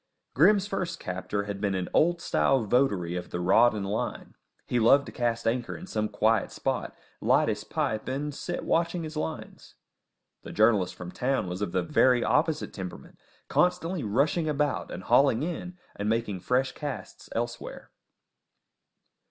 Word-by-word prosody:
Grim's 195 +7 +5
first 190 -3 -3
captor 95 +3 -3
had 100 -1 -5
been 100 -2 0
an 90 -1 -2
old 170 +2 +3
style 110 - +2
votary 100 -7 +1
of 90 - -5
the 90 - -4
rod 110 +6 +4
and 100 -2 -3
line; 100 +3 -3 0.3
he 125 - 0
loved 140 +5 +5
to - - -8
cast 120 -1 -1
anchor 120 +1 -1
in 180 - -9
some 110 - -2
quiet 110 +1 +2
spot, - - -3 0.2
light - - +3
his - - -2
pipe, 110 0 -2
and 145 +3 -3
sit - - -4
watching 170 +1 +1
his 155 0 -7
lines. 155 0 -6 0.7
The - - -9
journalist 105 -4 +3
from 90 -1 -8
town 125 -4 -1
was 90 +2 -5
of 105 - -2
the 90 -1 0
very 125 +7 +3
opposite 155 +1 +1
temperament, 95 -3 -8 0.3
constantly 180 -2 +1
rushing 145 - +1
about 150 0 -1
and - - -7
hauling 135 -2 +4
in 180 +2 -5 0.2
and 105 +1 -2
making 110 -4 -1
fresh 125 +8 +1
casts 145 -3 -7
elsewhere. 120 +1 -5
120 Hz, 160 wpm, -27 LUFS, 100-150 Hz, 0.7 s, Grim's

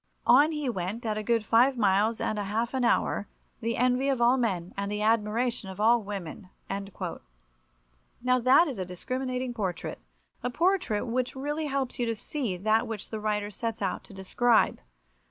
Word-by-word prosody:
On 300 +3 +6
he 300 -3 -3
went 210 +1 -3
at 215 -1 -1
a - - -2
good 225 0 +1
five 245 +4 +4
miles 210 +1 +2
and 215 - -1
a 205 - -2
half 225 +5 -1
an 260 -1 0
hour, 220 -3 +1 0.3
the 230 0 -2
envy 250 +2 +2
of 270 -3 +1
all 240 +2 +5
men 190 -9 -1
and 200 0 -3
the 210 0 -2
admiration 225 0 +1
of 190 - -9
all 230 +2 +4
women." 195 -2 -7 1.7
Now, 255 0 +3
that 260 +8 +5
is 260 -8 -5
a - - 0
discriminating 255 +7 -3
portrait—a 175 - -6
portrait 335 - +1
which 250 +2 -2
really 295 +3 -2
helps 270 -3 -2
you 240 - 0
to 230 - 0
see 220 -3 -3
that 215 +4 +2
which 220 -3 -6
the 220 - -3
writer 210 -1 -1
sets 225 +1 -4
out 190 - -2
to - - -14
describe. 225 +5 +2
230 Hz, 175 wpm, -28 LUFS, 205-255 Hz, 1.7 s, On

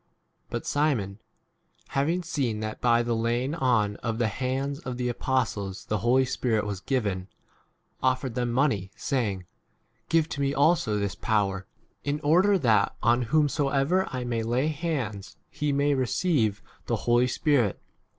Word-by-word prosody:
But - - -4
Simon, 120 -10 0 0.7
having 165 +6 0
seen 135 -10 -1
that 110 0 -5
by 120 -1 +4
the 120 0 0
laying 120 +5 0
on 120 -9 +1
of 115 -1 -3
the 115 -2 +1
hands 135 +5 -2
of 125 -5 -6
the 125 -1 -1
apostles 115 -6 -2
the 105 - -1
Holy 130 +5 +3
Spirit 115 -4 0
was 100 -2 -3
given, 105 -6 -1
19 95 +1 -10 0.7
offered 130 -1 0
them 120 0 -1
money, 120 -7 +1
saying, 105 -6 -2 0.6
Give 165 -1 +3
to 140 - -4
me 140 +1 0
also 140 -7 +3
this 100 -2 -1
power, 95 -3 -1 0.4
in 145 +1 -1
order 180 +7 +4
that 115 - +2
on 120 +2 +4
whomsoever 145 +3 +2
I 130 -1 -3
may 120 -2 -1
lay 120 +6 0
hands 135 - -3
he 150 -1 -1
may 140 +1 +2
receive 130 - +1 0.2
[the] - - +1
Holy 120 +1 +4
20 - - 0
Spirit. 125 - +1
125 Hz, 155 wpm, -27 LUFS, 110-140 Hz, 0.7 s, by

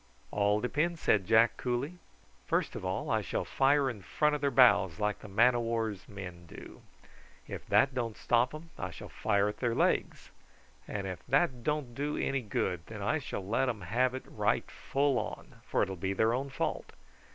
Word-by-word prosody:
"All 105 +1 +2
depends," 155 +7 0
said 100 - +2
Jack 115 +1 +5
coolly. 130 +8 -2 0.5
"First - - 0
of - - -5
all, - - -2
I - - +2
shall - - -2
fire 140 +1 +3
in 120 -6 -4
front 150 - +1
of 150 - -2
their 140 - +2
bows 100 -10 +5
like 105 0 0
the - - -10
man 115 +5 +4
o' 120 - 0
war's 115 -4 -2
men 90 -4 -8
do. - - -11 0.7
If - - -7
that 135 0 +4
don't 120 -4 -3
stop 120 +1 +2
'em 160 +1 -11
I 90 - -3
shall 85 - -10
fire 100 0 +1
at 105 - -4
their 120 -2 0
legs, - - 0 0.6
and 100 -2 -4
if 95 -2 -6
that 135 -2 +2
don't 150 -4 -1
do 145 +4 -2
any 135 -1 0
good 95 -5 -2
then 105 -2 -7
I 155 +10 +1
shall 100 -8 -5
let 120 +5 +1
'em 110 -5 -4
have 125 +8 +1
it 130 - -5
right - - 0
full, 140 -1 -1 0.2
for - - +2
it'll 95 - -3
be 95 +2 -2
their 110 +4 +2
own 135 +3 -2
fault. 135 - -3
120 Hz, 195 wpm, -31 LUFS, 100-135 Hz, 0.7 s, Jack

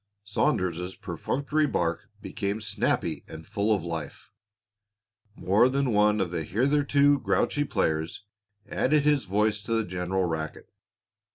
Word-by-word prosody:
Saunders's 90 -3 -1
perfunctory 140 - -1
bark 85 - -1
became 100 +2 -3
snappy 110 -1 -1
and 80 0 -10
full 100 +5 -1
of 100 -6 +1
life; 85 -2 -6 1.0
more 105 +7 +3
than 135 -2 0
one 105 0 +4
of 95 -3 -1
the 80 -2 -2
hitherto 140 - +3
grouchy 145 - +1
players 80 - -1 0.4
added 150 +2 +2
his 150 -2 +2
voice 105 +2 +1
to 115 - -3
the 115 -1 +1
general 90 +1 -1
racket. 80 -2 -4
105 Hz, 125 wpm, -27 LUFS, 90-130 Hz, 1.0 s, one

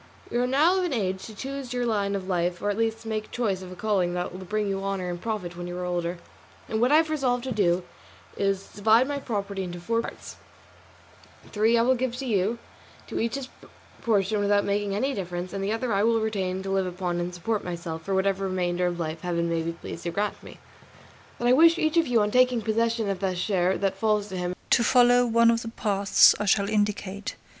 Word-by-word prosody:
You 240 - +1
are 250 - +1
now 310 +9 +3
of - - 0
an 350 -5 -1
age 190 -5 -2
to 220 - -11
choose 270 0 -5
your 245 -1 -1
line 200 -3 0
of 190 -1 -4
life 175 -1 0
or 205 - 0
at 205 - -4
least 225 0 -1
make 215 -1 -3
choice 205 -6 -1
of 185 -1 -9
a - - -8
calling 185 -3 0
that 180 0 -3
will 185 +1 -8
bring 210 +3 -1
you 195 0 -2
honour 195 -2 -2
and 175 0 -6
profit 205 -6 -4
when 175 0 -6
you 175 0 -5
are 180 - -3
older; 175 0 -2 0.5
and 220 0 -2
what 250 +3 +3
I - - +6
have 315 0 +3
resolved 250 -5 0
to 260 - -4
do 185 -5 +2 0.5
is 195 -1 0
to - - -18
divide 220 +5 +4
my 285 0 -2
property 200 -6 -3
into 175 -1 -5
four 230 +6 0
parts; - - -9 1.1
three 220 +2 +3
I 230 - +4
will 255 +2 +4
give 255 -1 -2
to 265 +2 -5
you, 215 -1 +1 0.5
to - - -4
each 230 +3 -1
his 270 -2 -5 0.5
portion 210 -3 +1
without 205 0 +2
making 200 0 -1
any 270 +7 0
difference, 180 -2 -5
and 195 -1 -3
the 200 - -1
other 225 0 -1
I 195 - +2
will 225 +1 +3
retain 190 -4 -2
to 195 - -4
live 190 -1 +1
upon 180 -1 -3
and 175 +1 -2
support 200 +5 -2
myself 170 -2 -5
for 195 +3 -2
whatever 195 0 +1
remainder 180 -1 0
of 175 0 -3
life 160 -1 -4
Heaven 170 -1 -1
may 165 -1 0
be 165 +1 -3
pleased 170 0 -8
to - - 0
grant 205 +4 -2
me. - - -12 0.8
But 240 - -1
I 245 - +6
wish 330 +5 +6
each 315 +1 +1
of 330 -2 +4
you 235 -3 +3
on 210 0 0
taking 250 -2 +3
possession 230 0 0
of 195 -2 -2
the 190 -1 -1
share 185 0 +1
that 195 -1 -1
falls 210 -1 +1
to 190 - -5
him 180 0 -2 0.2
to 235 - +5
follow 245 0 +5
one 230 0 +5
of 230 0 0
the 230 - -7
paths 200 -3 +4
I 210 - -1
shall 200 0 +3
indicate. 205 -1 -1
205 Hz, 235 wpm, -26 LUFS, 185-230 Hz, 1.1 s, I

